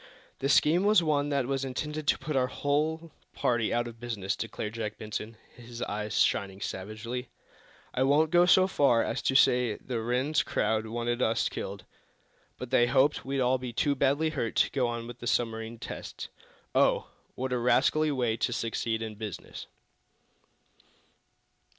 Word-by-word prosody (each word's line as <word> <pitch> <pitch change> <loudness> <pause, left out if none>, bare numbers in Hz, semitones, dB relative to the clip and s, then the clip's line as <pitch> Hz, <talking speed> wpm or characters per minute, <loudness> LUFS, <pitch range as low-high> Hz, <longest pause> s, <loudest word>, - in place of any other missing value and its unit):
"The 135 - -1
scheme 160 +5 +4
was 205 -3 +5
one 145 -2 +1
that 140 -3 +1
was 135 +1 -1
intended 150 +3 -4
to - - +4
put 150 +2 -4
our 130 -1 +2
whole 155 +5 -1 0.2
party 120 -2 +1
out 120 0 0
of 115 -1 -10
business," 105 -5 -3
declared 110 -1 -5
Jack 110 -2 -4
Benson, 110 +1 -6 0.2
his 120 0 -7
eyes 105 0 -1
shining 95 -2 +1
savagely. 110 +7 -5 0.6
"I 125 - -1
won't 145 +4 +3
go 175 0 +5
so 185 +1 +6
far 140 -10 +3
as - - -2
to 135 - 0
say 125 -4 +4
the 120 -3 -4
Rhinds 125 +6 +1
crowd 110 +1 0
wanted 120 +2 -2
us 115 -1 +1
killed, - - -6 0.7
but 125 -1 -7
they 120 -2 +4
hoped 135 +3 +3
we'd 135 0 -1
all 130 +1 +2
be 125 -2 -6
too 145 +5 +1
badly 140 +3 +1
hurt 115 -7 -3
to - - +3
go 130 -3 +1
on 120 -1 -4
with 120 0 -9
the 120 - -6
submarine 115 -1 -1
tests. - - -7 0.4
Oh, - - +2 0.2
what 130 0 -3
a 125 - 0
rascally 145 +5 +3
way 120 -5 0
to 120 - 0
succeed 115 -1 -2
in 110 -1 -5
business!" 105 -3 -7
125 Hz, 170 wpm, -29 LUFS, 115-140 Hz, 0.7 s, so